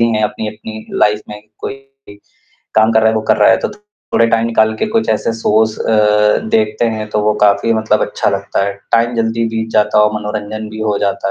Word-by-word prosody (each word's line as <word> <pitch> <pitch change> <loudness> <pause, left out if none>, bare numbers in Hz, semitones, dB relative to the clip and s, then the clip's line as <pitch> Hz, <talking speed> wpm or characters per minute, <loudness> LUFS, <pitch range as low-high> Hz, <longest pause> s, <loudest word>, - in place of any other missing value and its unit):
है 110 - 0
अपनी-अपनी 110 0 -5
लाइफ़ 105 0 +2
में 105 0 -8 0.2
कोई - - -4 1.0
काम 110 +1 +4
कर 110 - +4
रहा 110 - +4
है - - -2
वो 110 - 0
कर - - +4
रहा - - +4
है। - - +5
तो - - -5
थोड़ा 210 - -3
टाइम 115 0 +1
निकाल 110 -1 +2
के - - -1
कुछ 225 +1 -1
ऐसे 110 +1 0
शोज 110 0 +2
अ, 105 -1 +3 0.2
देखते 110 +1 +1
हैं 105 0 -5
तो 105 - 0
वो 105 0 +2
काफ़ी 100 +3 +3
मतलब 110 -1 +1
अच्छा - - -1
लगता 100 0 -1
है। 100 - -2 0.2
टाइम 115 +1 +2
जल्दी 115 0 0
बीत 110 0 -3
जाता 105 0 +2
है 105 - +6
और 105 - +1
मनोरंजन 105 +1 -5
भी 110 +1 -8
हो 105 -2 0
जाता 100 -1 -1
110 Hz, 220 wpm, -15 LUFS, 105-110 Hz, 1.0 s, है